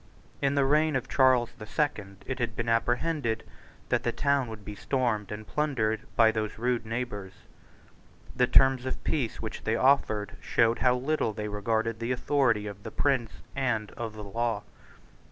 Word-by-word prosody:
In 140 Hz, 0 st, +2 dB
the 140 Hz, -1 st, +3 dB
reign 155 Hz, +2 st, +3 dB
of 130 Hz, -, -1 dB
Charles 130 Hz, -3 st, +4 dB
the 110 Hz, -, -8 dB
Second, 105 Hz, -11 st, -2 dB
it 135 Hz, 0 st, -4 dB
had 115 Hz, -3 st, -2 dB
been 120 Hz, +1 st, -3 dB
apprehended 120 Hz, +1 st, 0 dB, 0.5 s
that -, -, +2 dB
the -, -, 0 dB
town 140 Hz, -3 st, +1 dB
would 110 Hz, -3 st, -9 dB
be 105 Hz, -, -6 dB
stormed 110 Hz, -2 st, -1 dB
and 105 Hz, +1 st, -6 dB
plundered 115 Hz, -8 st, 0 dB
by 115 Hz, -1 st, +6 dB
those 110 Hz, -1 st, -3 dB
rude 120 Hz, -1 st, -1 dB
neighbours. 110 Hz, -5 st, -4 dB, 1.0 s
The 125 Hz, -, +3 dB
terms 130 Hz, 0 st, +4 dB
of 130 Hz, -, -4 dB
peace 130 Hz, -8 st, -1 dB
which 110 Hz, -, -5 dB
they 110 Hz, -, +1 dB
offered 115 Hz, -6 st, +2 dB
showed 115 Hz, 0 st, +2 dB
how 125 Hz, -1 st, +4 dB
little 130 Hz, -3 st, 0 dB
they 105 Hz, 0 st, -4 dB
regarded 110 Hz, +2 st, -1 dB
the 115 Hz, +2 st, -2 dB
authority 125 Hz, -4 st, +2 dB
of 100 Hz, -1 st, -7 dB
the -, -, -6 dB
prince 130 Hz, -6 st, +1 dB, 0.3 s
and 120 Hz, -6 st, -1 dB
of 115 Hz, -2 st, -5 dB
the 105 Hz, -1 st, -8 dB
law. 115 Hz, +1 st, -2 dB
115 Hz, 170 wpm, -28 LUFS, 110-130 Hz, 1.0 s, by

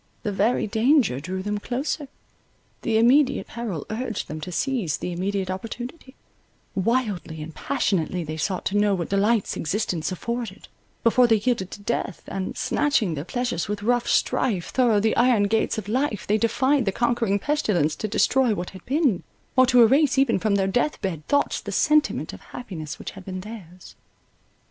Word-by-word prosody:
The 210 Hz, -, -1 dB
very 205 Hz, +5 st, +1 dB
danger 225 Hz, -, +3 dB
drew 185 Hz, +5 st, -4 dB
them 210 Hz, +1 st, -2 dB
closer. 275 Hz, +6 st, -3 dB, 0.7 s
The 225 Hz, -1 st, +1 dB
immediate 260 Hz, +4 st, +4 dB
peril 215 Hz, -10 st, -5 dB
urged 225 Hz, -1 st, -3 dB
them 155 Hz, +1 st, -5 dB
to 180 Hz, -, -6 dB
seize 210 Hz, -, -1 dB
the 180 Hz, -, -4 dB
immediate 190 Hz, +1 st, -2 dB
opportunity; 245 Hz, -, -7 dB, 0.6 s
wildly 195 Hz, -6 st, -1 dB
and 160 Hz, +1 st, -9 dB
passionately 185 Hz, -, -1 dB
they 155 Hz, 0 st, -5 dB
sought 180 Hz, +4 st, -2 dB
to 200 Hz, -, 0 dB
know 205 Hz, -1 st, +3 dB
what 170 Hz, -3 st, -3 dB
delights 205 Hz, +2 st, +1 dB
existence 175 Hz, -1 st, -2 dB
afforded, 225 Hz, +1 st, -5 dB, 0.4 s
before 240 Hz, +2 st, +5 dB
they 225 Hz, -, +5 dB
yielded 215 Hz, -4 st, 0 dB
to 205 Hz, -, -9 dB
death, 200 Hz, -4 st, -2 dB
and 190 Hz, -1 st, -4 dB
Snatching 260 Hz, -, +1 dB
their 145 Hz, -1 st, -4 dB
pleasures 245 Hz, -4 st, -2 dB
with 205 Hz, 0 st, -4 dB
rough 245 Hz, +2 st, +1 dB
strife 235 Hz, -8 st, +1 dB
Thorough 240 Hz, -5 st, +3 dB
the 220 Hz, +2 st, +1 dB
iron 240 Hz, -4 st, +4 dB
gates 220 Hz, +2 st, +1 dB
of 210 Hz, -3 st, -5 dB
life, 245 Hz, -1 st, -1 dB
they 210 Hz, +1 st, +2 dB
defied 260 Hz, +4 st, +2 dB
the 195 Hz, -, +1 dB
conquering 235 Hz, -2 st, +1 dB
pestilence 205 Hz, -, 0 dB
to 215 Hz, -, -2 dB
destroy 245 Hz, +2 st, +2 dB
what 175 Hz, -1 st, -5 dB
had 190 Hz, -, -12 dB
been, 270 Hz, -, +2 dB, 0.3 s
or 255 Hz, 0 st, +6 dB
to 245 Hz, -1 st, +6 dB
erase 270 Hz, +3 st, +4 dB
even 265 Hz, -6 st, +3 dB
from 210 Hz, +1 st, +1 dB
their 195 Hz, -1 st, +2 dB
death 245 Hz, +10 st, 0 dB
bed 165 Hz, -6 st, -3 dB
thoughts 285 Hz, 0 st, +1 dB
the -, -, -6 dB
sentiment 305 Hz, -1 st, +2 dB
of -, -, -10 dB
happiness 170 Hz, -11 st, -7 dB
which -, -, -7 dB
had 195 Hz, -, -11 dB
been 185 Hz, 0 st, -5 dB
theirs. 185 Hz, -4 st, -11 dB
215 Hz, 175 wpm, -24 LUFS, 190-245 Hz, 0.7 s, or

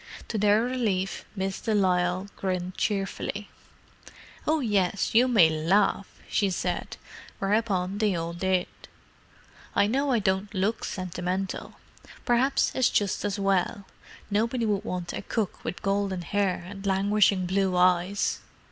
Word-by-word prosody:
To 220 Hz, -, -1 dB
their 210 Hz, +2 st, +4 dB
relief, 220 Hz, -7 st, -1 dB
Miss 190 Hz, -1 st, -3 dB
de 220 Hz, -2 st, 0 dB
Lisle 180 Hz, -1 st, +1 dB
grinned 185 Hz, -1 st, -3 dB
cheerfully. 200 Hz, 0 st, -2 dB, 1.0 s
"Oh, 315 Hz, +1 st, +3 dB
yes, 200 Hz, -6 st, 0 dB
you 240 Hz, +3 st, +6 dB
may 215 Hz, -10 st, +6 dB
laugh!" 190 Hz, +5 st, +2 dB, 0.2 s
she 200 Hz, -2 st, +1 dB
said—whereupon 195 Hz, +1 st, -2 dB
they 210 Hz, -4 st, +2 dB
all 165 Hz, 0 st, -3 dB
did. 185 Hz, +1 st, +1 dB, 1.1 s
"I 200 Hz, -, +4 dB
know 275 Hz, +7 st, 0 dB
I 245 Hz, -, +3 dB
don't 195 Hz, -1 st, 0 dB
look 200 Hz, +4 st, 0 dB
sentimental. 185 Hz, +1 st, -4 dB, 0.5 s
Perhaps 250 Hz, +3 st, +2 dB
it's 260 Hz, -, +3 dB
just 200 Hz, -2 st, 0 dB
as 205 Hz, -1 st, -1 dB
well; 195 Hz, 0 st, 0 dB, 0.5 s
nobody 230 Hz, +3 st, +1 dB
would 205 Hz, -2 st, 0 dB
want 180 Hz, -5 st, -4 dB
a -, -, -4 dB
cook 215 Hz, -5 st, -3 dB
with -, -, -5 dB
golden 195 Hz, -2 st, 0 dB
hair 195 Hz, -1 st, 0 dB
and 195 Hz, +1 st, -9 dB
languishing 195 Hz, -1 st, +2 dB
blue 190 Hz, 0 st, +1 dB
eyes. 180 Hz, +2 st, +2 dB
195 Hz, 130 wpm, -27 LUFS, 185-210 Hz, 1.1 s, you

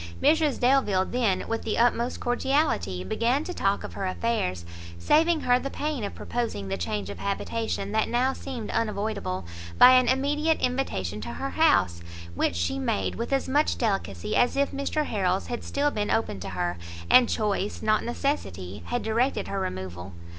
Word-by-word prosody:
Mrs 310 Hz, -3 st, +3 dB
Delvile 245 Hz, -7 st, +3 dB
then, 220 Hz, -6 st, 0 dB
with 225 Hz, 0 st, -2 dB
the 220 Hz, -, -2 dB
utmost 240 Hz, +1 st, +1 dB
cordiality, 245 Hz, -, 0 dB
began 235 Hz, -, 0 dB
to 360 Hz, -, -5 dB
talk 200 Hz, -, 0 dB
of -, -, -7 dB
her 195 Hz, -, -3 dB
affairs, 185 Hz, -, -1 dB, 0.3 s
saving 315 Hz, -, +3 dB
her 245 Hz, 0 st, +3 dB
the 275 Hz, -, -4 dB
pain 290 Hz, -4 st, -3 dB
of 200 Hz, -, -4 dB
proposing 230 Hz, -, -3 dB
the 95 Hz, -, -1 dB
change 95 Hz, +3 st, -3 dB
of -, -, -9 dB
habitation 200 Hz, 0 st, -2 dB
that 220 Hz, 0 st, +1 dB
now 255 Hz, +3 st, +2 dB
seemed 250 Hz, -7 st, -6 dB
unavoidable, 205 Hz, -, -2 dB, 0.3 s
by 250 Hz, -, +9 dB
an 255 Hz, -1 st, +5 dB
immediate 295 Hz, +4 st, +1 dB
invitation 105 Hz, -, -2 dB
to 80 Hz, -5 st, -5 dB
her 85 Hz, +3 st, -4 dB
house, 85 Hz, -1 st, +3 dB, 0.3 s
which 85 Hz, -, 0 dB
she 85 Hz, +1 st, -1 dB
made 95 Hz, +1 st, -1 dB
with 235 Hz, -, -4 dB
as 270 Hz, -1 st, +1 dB
much 290 Hz, +3 st, +2 dB
delicacy 195 Hz, -, -1 dB
as 245 Hz, +2 st, +3 dB
if 280 Hz, 0 st, +2 dB
Mr 280 Hz, +2 st, -1 dB
Harrel's 190 Hz, -5 st, 0 dB
had 240 Hz, -1 st, -5 dB
still 290 Hz, +1 st, 0 dB
been 210 Hz, -3 st, -2 dB
open 225 Hz, -, 0 dB
to 95 Hz, -, -6 dB
her, 90 Hz, -1 st, -2 dB, 0.3 s
and 250 Hz, -2 st, +6 dB
choice, 210 Hz, -2 st, -1 dB
not 215 Hz, 0 st, +2 dB
necessity, 100 Hz, -, -3 dB
had 245 Hz, -, -2 dB
directed 235 Hz, +5 st, 0 dB
her 195 Hz, -, -2 dB
removal. 90 Hz, -, -5 dB
220 Hz, 175 wpm, -26 LUFS, -, 0.3 s, by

